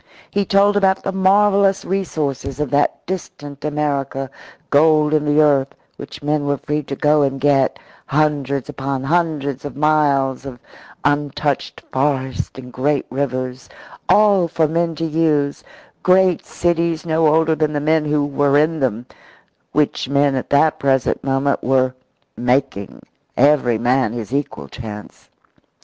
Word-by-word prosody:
He 200 0 0
told 200 +2 +3
about 195 -1 +2
the 195 - -2
marvellous 195 +1 +3
resources 150 -8 -3
of 150 -3 -2
that 145 0 0
distant 145 -6 -7
America 140 -3 -2 0.4
gold 155 0 +4
in 150 -1 +1
the 150 +1 +4
earth, 140 -2 +2 0.2
which 140 - -10
men 145 0 0
were 140 0 0
free 150 +3 -2
to 140 -1 -6
go 150 +2 +2
and 135 -1 0
get, 135 -1 +2 0.3
hundreds 140 -3 0
upon 135 -2 -4
hundreds 150 -4 -1
of 145 -1 -7
miles 140 -3 +1
of 135 -3 -8 0.5
untouched 145 -1 -1
forests 130 -1 -1
and 125 -1 -10
great 145 +2 0
rivers 130 -1 -3 0.4
all 205 -4 +4
for 160 -1 +1
men 165 +1 -1
to 165 - -3
use, 150 -3 0 0.4
great 185 -1 +3
cities 170 -1 -1
no 160 -1 +2
older 160 +1 +3
than 155 -1 -1
the 145 - 0
men 155 +1 +1
who 150 -1 +1
were 145 0 +1
in 155 +2 +1
them, 120 -3 -1 0.7
which 145 -3 0
men 140 0 +2
at 130 - -3
that 150 +2 +3
present 135 -2 0
moment 135 +1 0
were 130 0 +2 0.4
making 125 -5 -1 0.3
every 130 -4 +3
man 120 0 +1
his 120 0 -6
equal 140 +1 -3
chance. 105 -3 -10
145 Hz, 145 wpm, -19 LUFS, 135-160 Hz, 0.7 s, gold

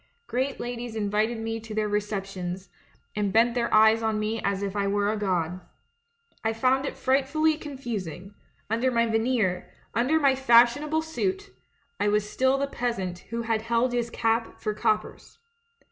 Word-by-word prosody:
Great 260 - -2
ladies 240 -1 -5
invited 215 +2 0
me 225 0 -3
to 220 -1 -8
their 215 -1 +1
receptions, 195 -3 -3 0.5
and 205 -2 0
bent 230 +3 +4
their 235 -1 0
eves 220 +1 +6
on 220 -1 0
me 215 +1 -2
as 200 0 -1
if 200 0 -3
I 200 -1 0
were 205 +1 +1
a - - -1
ffod. 185 -4 -1 0.8
I 225 0 +1
found 260 +4 +2
it - - -6
frightfully 280 +4 +2
confusing; 220 - -6 0.3
under 230 +4 +1
my 235 -2 +2
veneer, 225 -5 0 0.2
under 255 +9 +2
my 275 -3 +4
fashionable 265 +5 +4
suit, 385 +5 -3 0.5
I - - +1
was 210 0 +1
still 260 +4 +2
the 280 - 0
peasant 230 -10 -3
who 230 0 -3
had 225 -1 0
held 235 +2 +1
his 240 -1 0
cap 230 0 -1
for 215 - -2
coppers. 215 0 -2
225 Hz, 160 wpm, -26 LUFS, 210-255 Hz, 0.8 s, eves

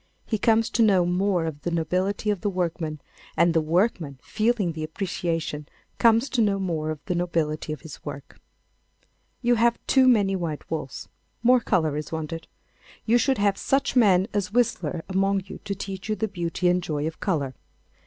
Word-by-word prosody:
He 220 - -1
comes 225 +1 +3
to 235 - +1
know 195 -5 +5
more 180 -1 +1
of 150 -2 -5
the - - -2
nobility 180 +5 0
of 205 - -3
the 205 - 0
workman, 170 -4 -2 0.4
and 170 0 +4
the 165 - +3
workman, 165 - 0
feeling 215 -5 0
the 155 -1 -5
appreciation, 165 -3 -3 0.3
comes 230 +3 +4
to 245 - +2
know 205 -2 +2
more 165 -5 -2
of 155 -2 -6
the - - -1
nobility 165 -3 -1
of 155 - -5
his 160 -4 -11
work. 140 -2 -8 1.0
You 240 0 +4
have 235 0 +4
too 265 -1 +4
many 205 -6 +4
white 165 -5 -4
walls. 150 -4 -4 0.4
More 250 +1 +6
colour 160 -9 +1
is 150 0 -5
wanted. 160 0 -5 0.6
You 240 +2 +4
should 265 +1 +2
have 200 -1 +1
such 275 0 0
men 195 -6 +5
as 205 -2 -1
Whistler 185 -9 0
among 195 0 +1
you 195 - -9
to 200 -1 -2
teach 195 +1 -6
you 215 - +1
the 220 - -1
beauty 180 -2 -2
and 180 0 +3
joy 150 -3 -2
of 160 0 -4
colour. 145 -9 -1
180 Hz, 185 wpm, -25 LUFS, 160-210 Hz, 1.0 s, More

